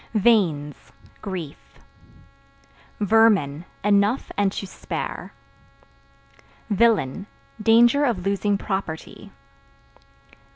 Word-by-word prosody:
Veins 180 -10 +1 0.3
Grief. 180 -8 -8 1.2
Vermin 200 -8 +3 0.2
Enough 205 +4 +1
and 200 -1 +1
to 200 - -5
spare. 185 - -6 1.4
Villain 205 - +1 0.3
Danger 235 +6 +4
of 205 -8 -2
losing 200 +1 0
property. 190 -5 -6
200 Hz, 70 wpm, -23 LUFS, 180-225 Hz, 1.4 s, Danger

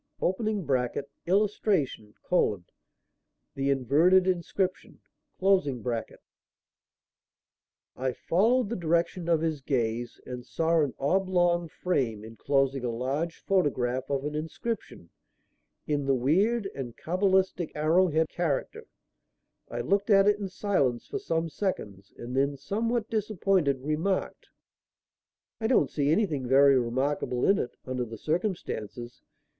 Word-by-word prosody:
[Illustration: 175 - -1 1.4
THE 135 0 -1
INVERTED 150 +8 +4
INSCRIPTION.] 185 +1 -2 3.0
I 130 0 -1
followed 220 - +1
the 235 - -2
direction 170 +1 0
of 165 -2 +3
his 160 -3 -1
gaze 120 -3 -2
and 125 -1 -6
saw 165 +5 +1
an 145 -4 -1
oblong 175 +1 +1
frame 125 -12 -1
enclosing 135 +3 0
a 125 - -1
large 135 +8 -2
photograph 130 -9 0
of 140 0 -1
an 150 - -3
inscription 160 - -5 0.7
in 145 -2 -1
the 135 - +3
weird 195 - +2
and 125 -4 -7
cabalistic 185 0 +1
arrow 160 +5 +3
head 160 -1 +1
character. 165 -6 -2 0.8
I 120 - -3
looked 200 - 0
at 195 -1 +6
it 210 0 +3
in 200 -2 -4
silence 160 - 0
for 415 - -4
some 165 - -1
seconds 105 - -4
and 120 +2 -6
then, 140 +1 +1
somewhat 220 - -1
disappointed, 195 - +1
remarked: 160 +6 -2 1.1
"I 220 - 0
don't 190 - +3
see 145 -1 0
anything 160 - +1
very 135 +1 +6
remarkable 125 +1 -1
in 195 - +4
it, 120 - -4
under 130 -1 -2
the 115 -1 -7
circumstances. 140 - -3
155 Hz, 115 wpm, -28 LUFS, 130-190 Hz, 3.0 s, at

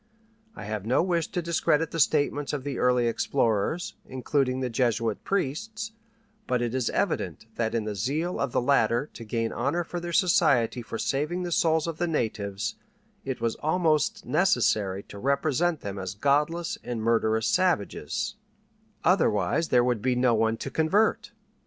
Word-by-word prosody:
I - - -8
have 105 -2 -4
no 125 +9 +2
wish 170 -3 0
to 175 - -3
discredit 165 -1 +1
the 165 - -3
statements 145 -1 +1
of 140 -3 -3
the 140 -2 -4
early 125 -1 +3
explorers, 115 - 0
including 130 0 0
the 130 - -1
Jesuit 115 -2 0
priests; 215 +6 -2 0.6
but 125 - +1
it 120 -1 -2
is 130 -2 0
evident - - -1
that 115 0 -1
in 115 - 0
the 105 0 -3
zeal 145 - -2
of 140 -3 -1
the 120 - +1
latter 125 0 +2
to 115 - -9
gain 115 +1 -2
honor 145 +8 0
for 175 +1 -5
their 175 0 -5
society 155 - +3
for 115 0 -6
saving 150 +9 -1
the 175 - -4
souls 160 -1 +2
of 165 -2 -5
the 175 - +1
natives 110 -8 -2 0.5
it 130 -3 -4
was 115 -1 +1
almost 155 -1 +1
necessary 105 - +2
to 100 - -11
represent 150 +6 +1
them 100 -1 -5
as 95 0 -5
godless 150 +8 0
and 120 -3 -4
murderous 110 -1 +2
savages 175 - 0 0.7
otherwise 105 - +2
there 125 -1 +4
would 120 -3 0
be 125 +1 +1
no 125 -1 +3
one 110 0 +1
to - - -6
convert! 195 +11 +1
130 Hz, 165 wpm, -27 LUFS, 115-165 Hz, 0.7 s, there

